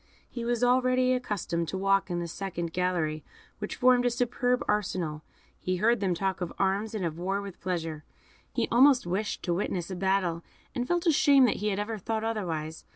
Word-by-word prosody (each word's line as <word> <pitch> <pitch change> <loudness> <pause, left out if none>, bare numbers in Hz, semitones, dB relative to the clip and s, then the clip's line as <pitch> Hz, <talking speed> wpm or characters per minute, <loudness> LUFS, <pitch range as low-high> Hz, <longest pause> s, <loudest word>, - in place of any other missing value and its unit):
He 240 - -6
was 240 0 0
already 255 +1 +3
accustomed 200 -9 -2
to 190 - -3
walk 195 0 +2
in 175 -1 -1
a - - -4
second 170 -2 -4
gallery, 170 -4 -1 0.4
which 210 - -4
formed 250 -1 +4
a 245 - +3
superb 245 +1 0
arsenal; 180 -7 -1 0.4
he 185 - -1
heard 225 +5 +2
them 190 -3 0
talk 190 +1 -2
of 175 - -2
arms 200 +3 0
and 195 -4 -2
of 165 0 -4
war 195 +3 -1
with 200 -3 -8
pleasure; 165 -4 -3 0.5
he - - 0
almost 255 0 +6
wished 195 +5 -2
to 175 - 0
witness 180 0 -2
a - - -3
battle, 180 -2 0 0.3
and 245 0 -2
felt 350 +2 0
ashamed 280 -6 +5
he 210 - -2
had 200 -2 0
ever 210 +1 -3
thought 220 +3 -2
otherwise. 165 -8 -3
195 Hz, 190 wpm, -28 LUFS, 175-240 Hz, 0.5 s, almost